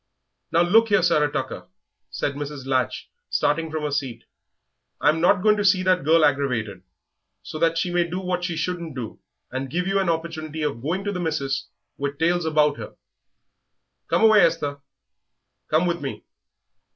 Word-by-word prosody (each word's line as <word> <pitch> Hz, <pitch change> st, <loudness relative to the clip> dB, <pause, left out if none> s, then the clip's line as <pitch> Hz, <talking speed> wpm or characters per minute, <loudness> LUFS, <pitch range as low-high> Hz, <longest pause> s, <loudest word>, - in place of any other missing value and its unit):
"Now 165 Hz, +1 st, +4 dB
look 225 Hz, +6 st, +4 dB
you 205 Hz, -, +4 dB
here, -, -, 0 dB
Sarah 150 Hz, -4 st, +3 dB
Tucker," -, -, -4 dB, 0.4 s
said 140 Hz, -, -2 dB
Mrs. 145 Hz, -1 st, -6 dB
Latch, 130 Hz, -3 st, -1 dB, 0.2 s
starting 160 Hz, +2 st, 0 dB
from 155 Hz, -1 st, -4 dB
her 150 Hz, -, -2 dB
seat, 135 Hz, -4 st, -3 dB, 0.8 s
"I'm 155 Hz, +2 st, +2 dB
not 180 Hz, +2 st, +3 dB
going 210 Hz, -1 st, +4 dB
to 205 Hz, -, 0 dB
see 190 Hz, -2 st, +4 dB
that 185 Hz, -3 st, +2 dB
girl 160 Hz, +1 st, +5 dB
aggravated, 125 Hz, -9 st, -1 dB, 0.6 s
so 155 Hz, -, -7 dB
that 165 Hz, 0 st, +2 dB
she 175 Hz, +2 st, 0 dB
may 175 Hz, -1 st, +1 dB
do 180 Hz, +2 st, -3 dB
what 180 Hz, -1 st, -2 dB
she 175 Hz, -2 st, -2 dB
shouldn't 170 Hz, -3 st, -3 dB
do, 120 Hz, -5 st, -6 dB, 0.3 s
and 130 Hz, +1 st, -4 dB
give 180 Hz, +6 st, -1 dB
you 195 Hz, +1 st, +1 dB
an 190 Hz, -3 st, 0 dB
opportunity 160 Hz, -2 st, -3 dB
of 140 Hz, -6 st, -2 dB
going 170 Hz, +8 st, -2 dB
to 205 Hz, -, -2 dB
the 185 Hz, -, -4 dB
missis 140 Hz, -5 st, -2 dB, 0.3 s
with 140 Hz, 0 st, -3 dB
tales 170 Hz, +2 st, +1 dB
about 150 Hz, -2 st, +2 dB
her. -, -, -9 dB, 1.1 s
Come -, -, +1 dB
away, 220 Hz, -2 st, +7 dB
Esther, 145 Hz, -4 st, +1 dB, 0.9 s
come 155 Hz, +3 st, +3 dB
with 170 Hz, -1 st, -1 dB
me. 140 Hz, -, -5 dB
160 Hz, 175 wpm, -23 LUFS, 145-180 Hz, 1.1 s, away